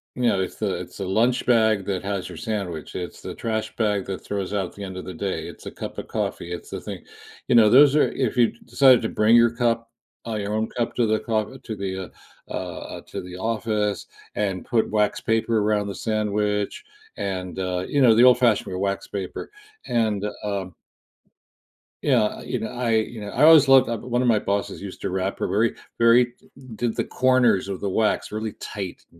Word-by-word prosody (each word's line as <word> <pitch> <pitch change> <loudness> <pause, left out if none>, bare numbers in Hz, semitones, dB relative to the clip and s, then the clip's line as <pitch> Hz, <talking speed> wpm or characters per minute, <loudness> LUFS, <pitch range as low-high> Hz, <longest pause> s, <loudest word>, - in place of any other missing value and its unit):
You 125 - -3
know, 95 - +1
it's 95 - -4
the, - - -1
it's - - -9
a 100 - -2
lunch 115 +6 +2
bag 110 -5 +3
that 95 -2 -2
has 100 -2 -3
your - - -9
sandwich, 100 -9 -4
it's 90 -1 -5
the - - -6
trash 110 -1 -3
bag 105 -4 0
that 95 -2 -5
throws 100 -1 -4
out 100 -3 0
at - - -15
the 100 - -7
end 95 -1 -6
of 95 - -7
the 95 - -6
day, 95 +3 -3
it's - - -11
a - - -6
cup - - -7
of - - -6
coffee, 85 - -3
it's 85 - -8
the - - -5
thing, - - -7 0.4
you 125 - +3
know, 115 -2 +7
those 140 +5 +7
are, 150 - +3
if 130 -4 -2
you 120 -2 +4
decided 130 -3 +5
to 110 - -2
bring 110 +2 +4
your 120 0 +6
cup, 115 -1 0 0.4
uh, 115 - -2
your 105 0 -3
own 110 +1 -1
cup 120 -1 -2
to 120 -2 +2
the 110 0 +2
co 110 +2 -2
to 115 -4 -7
the, 95 -2 -5 0.4
uh, - - -7
uh, - - -4 0.2
uh, - - -10
to - - -5
the 90 0 -9
office, 105 -1 -1 0.3
and 95 -3 -2
put 115 -3 +1
wax 105 -1 +1
paper 115 0 +1
around 105 -1 +1
the 100 - -5
sandwich, 105 -2 -1 0.3
and, 95 -2 -4
uh, 90 -1 -2
you 145 - 0
know, 125 -4 +7
the 115 +2 +5
old 125 -1 +7
fashioned 105 -6 +1
wax 100 0 -2
paper, 95 -3 -5 0.4
and, 110 -4 0 0.2
um 100 -3 -3 1.3
yeah, 130 -6 +4
uh, 105 - -3
you 125 - -3
know, 110 - -3
I, 125 -1 -3
you 110 0 -1
know, 105 - -6
I - - 0
always 155 -4 +8
loved 135 -1 +7
uh, 115 - -2
one 120 +2 -1
of 125 - +1
my 115 -2 +4
bosses 100 0 -2
used 100 -2 -8
to - - -2
wrap 95 +1 -2
her - - 0
very 110 +3 +1 0.2
very 120 +1 +5 0.4
did 120 0 -2
the - - 0
corners 130 -7 +2
of 95 - -4
the 100 - -2
wax 110 +2 +1
really 110 +1 -4
tight, 95 -4 -6
110 Hz, 220 wpm, -24 LUFS, 100-115 Hz, 1.3 s, always